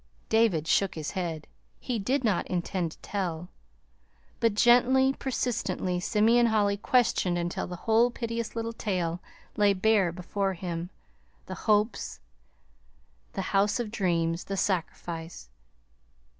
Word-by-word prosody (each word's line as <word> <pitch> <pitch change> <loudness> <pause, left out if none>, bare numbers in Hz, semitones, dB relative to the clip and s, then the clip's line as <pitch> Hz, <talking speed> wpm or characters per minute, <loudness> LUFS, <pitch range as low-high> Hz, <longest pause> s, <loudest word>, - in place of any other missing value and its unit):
David 220 -9 +3
shook 195 +2 +2
his 155 -2 -4
head. 170 -5 -4 0.3
He 245 -3 -3
did 255 +7 0
not 210 -6 +1
intend 175 -2 -2
to - - -18
tell. 180 -4 -3 0.9
But 230 -3 +2
gently, 250 +4 +5
persistently, 230 -9 -2
Simeon 225 +5 +3
Holly 205 -2 +2
questioned 200 -5 +2
until 175 0 -2
the 180 - -6
whole 230 +2 +4
piteous 230 -1 -4
little 230 0 -3
tale 180 -6 -2 0.4
lay 205 -1 +4
bare 195 -2 +3
before 190 +3 -2
him: 170 -1 -4 0.6
the - - -6 0.2
hopes, 210 0 +1 1.1
the 195 - -3
house 205 +4 +3
of 230 -3 -3
dreams, 170 -5 0
the 195 - -4
sacrifice. 165 - -3
200 Hz, 125 wpm, -28 LUFS, 175-230 Hz, 1.1 s, gently